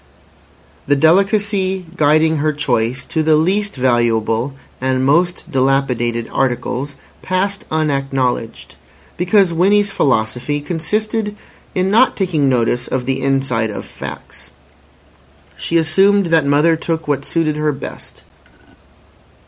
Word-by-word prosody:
The 145 Hz, -, +3 dB
delicacy 190 Hz, +3 st, +2 dB
guiding 155 Hz, +1 st, +3 dB
her 155 Hz, +1 st, 0 dB
choice 130 Hz, -3 st, -1 dB
to 160 Hz, -, -1 dB
the 155 Hz, 0 st, +3 dB
least 195 Hz, +6 st, 0 dB
valuable 120 Hz, 0 st, 0 dB, 0.3 s
and 130 Hz, 0 st, 0 dB
most 175 Hz, +6 st, +1 dB
dilapidated 130 Hz, -3 st, 0 dB
articles 130 Hz, +2 st, -2 dB, 0.3 s
passed 195 Hz, +2 st, -2 dB
unacknowledged, 135 Hz, -6 st, -2 dB, 0.4 s
because 180 Hz, 0 st, +2 dB
Winnie's 200 Hz, +4 st, +3 dB
philosophy 125 Hz, -, 0 dB
consisted 210 Hz, +7 st, -2 dB, 0.4 s
in 185 Hz, +1 st, +1 dB
not 240 Hz, +5 st, +4 dB
taking 165 Hz, -8 st, +1 dB
notice 120 Hz, -1 st, 0 dB
of 125 Hz, -1 st, -2 dB
the 135 Hz, +1 st, -1 dB
inside 135 Hz, -4 st, 0 dB
of 105 Hz, -, -6 dB
facts; -, -, -10 dB, 1.1 s
she 170 Hz, -, -1 dB
assumed 195 Hz, +5 st, +3 dB
that 160 Hz, -4 st, +3 dB
mother 150 Hz, +4 st, +3 dB
took 160 Hz, -1 st, -3 dB
what 140 Hz, -2 st, -1 dB
suited 160 Hz, -1 st, -1 dB
her 150 Hz, 0 st, +1 dB
best. 135 Hz, -, -9 dB
150 Hz, 115 wpm, -17 LUFS, 130-180 Hz, 1.1 s, not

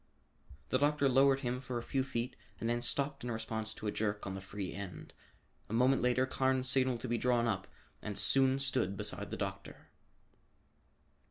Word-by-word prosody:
The 130 Hz, -, +2 dB
doctor 145 Hz, 0 st, +3 dB
lowered 135 Hz, +1 st, +4 dB
him 125 Hz, -1 st, -2 dB
for 125 Hz, -2 st, -4 dB
a 120 Hz, -, -4 dB
few 135 Hz, +2 st, 0 dB
feet 125 Hz, -1 st, -3 dB, 0.2 s
and 115 Hz, -, -2 dB
then 120 Hz, +1 st, 0 dB
stopped 140 Hz, +2 st, -2 dB
in 125 Hz, -, -3 dB
response 110 Hz, -1 st, -3 dB
to -, -, -8 dB
a 105 Hz, -, +1 dB
jerk 105 Hz, -1 st, -2 dB
on 95 Hz, -, -3 dB
the 95 Hz, -, -6 dB
free 95 Hz, -1 st, -5 dB
end. 100 Hz, -2 st, -7 dB, 0.6 s
A -, -, -5 dB
moment 125 Hz, +3 st, +4 dB
later 125 Hz, +1 st, +3 dB
Carnes 130 Hz, 0 st, +1 dB
signaled 130 Hz, -2 st, +2 dB
to 130 Hz, -, -4 dB
be 120 Hz, -1 st, 0 dB
drawn 120 Hz, -2 st, +2 dB
up 100 Hz, -5 st, -1 dB, 0.3 s
and 105 Hz, -2 st, -4 dB
soon 130 Hz, +6 st, +4 dB
stood 130 Hz, -8 st, +1 dB
beside -, -, -3 dB
the -, -, -4 dB
doctor. -, -, -6 dB
125 Hz, 185 wpm, -34 LUFS, 110-130 Hz, 0.6 s, lowered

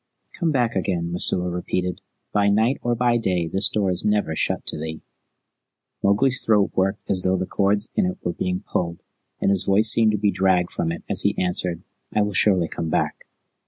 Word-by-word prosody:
"Come 170 Hz, -3 st, -1 dB
back 120 Hz, -5 st, 0 dB
again," 90 Hz, -3 st, -1 dB
Messua 90 Hz, 0 st, 0 dB
repeated. 90 Hz, 0 st, -3 dB, 0.3 s
"By 100 Hz, 0 st, +3 dB
night 110 Hz, +6 st, +2 dB
or 120 Hz, 0 st, 0 dB
by 120 Hz, 0 st, +2 dB
day 90 Hz, -7 st, -1 dB
this 95 Hz, +5 st, +1 dB
door 100 Hz, -3 st, 0 dB
is 90 Hz, -, -1 dB
never 105 Hz, -7 st, 0 dB
shut -, -, 0 dB
to -, -, -2 dB
thee." 80 Hz, 0 st, -6 dB, 1.0 s
Mowgli's 125 Hz, +7 st, +2 dB
throat 105 Hz, -3 st, +2 dB
worked 95 Hz, +2 st, -1 dB
as 95 Hz, -2 st, +2 dB
though 95 Hz, +1 st, +1 dB
the 95 Hz, -, -2 dB
cords 100 Hz, +3 st, 0 dB
in 195 Hz, -, +1 dB
it 185 Hz, +1 st, -4 dB
were 85 Hz, -, -2 dB
being 90 Hz, +2 st, -3 dB
pulled, 85 Hz, -1 st, -3 dB, 0.4 s
and -, -, +1 dB
his 95 Hz, -2 st, +1 dB
voice 105 Hz, +3 st, +5 dB
seemed 110 Hz, -2 st, +4 dB
to -, -, +1 dB
be 105 Hz, 0 st, +1 dB
dragged 95 Hz, -2 st, +1 dB
from 80 Hz, -, -2 dB
it 85 Hz, -, -6 dB
as -, -, +4 dB
he -, -, 0 dB
answered, 90 Hz, -1 st, -1 dB, 0.3 s
"I 105 Hz, -, +2 dB
will 105 Hz, 0 st, -3 dB
surely 95 Hz, -3 st, +3 dB
come 80 Hz, -, -4 dB
back." -, -, -2 dB
95 Hz, 200 wpm, -22 LUFS, 90-105 Hz, 1.0 s, voice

